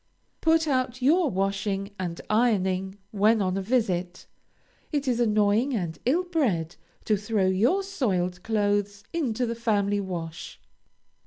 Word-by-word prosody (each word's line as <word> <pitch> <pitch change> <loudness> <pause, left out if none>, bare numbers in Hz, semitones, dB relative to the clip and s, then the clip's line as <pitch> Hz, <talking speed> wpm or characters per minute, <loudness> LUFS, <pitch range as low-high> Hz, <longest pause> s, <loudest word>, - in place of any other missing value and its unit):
Put 320 0 +3
out 255 -2 -1
your 320 +4 +4
washing 195 0 -1
and 175 -2 -4
ironing 195 -4 +1
when 215 +2 +3
on 185 -2 0
a 195 - -1
visit. 185 -5 -1 0.7
It 290 -3 -1
is 245 -2 +1
annoying 215 +3 +2
and 170 -6 -3
ill 315 +9 +2
bred 230 - -1 0.3
to 215 - +3
throw 210 -1 0
your 225 - +2
soiled 185 - -1
clothes 205 -1 0
into 255 -7 0
the 230 - -2
family 205 -3 0
wash. 170 -4 -6
210 Hz, 135 wpm, -26 LUFS, 190-250 Hz, 0.7 s, your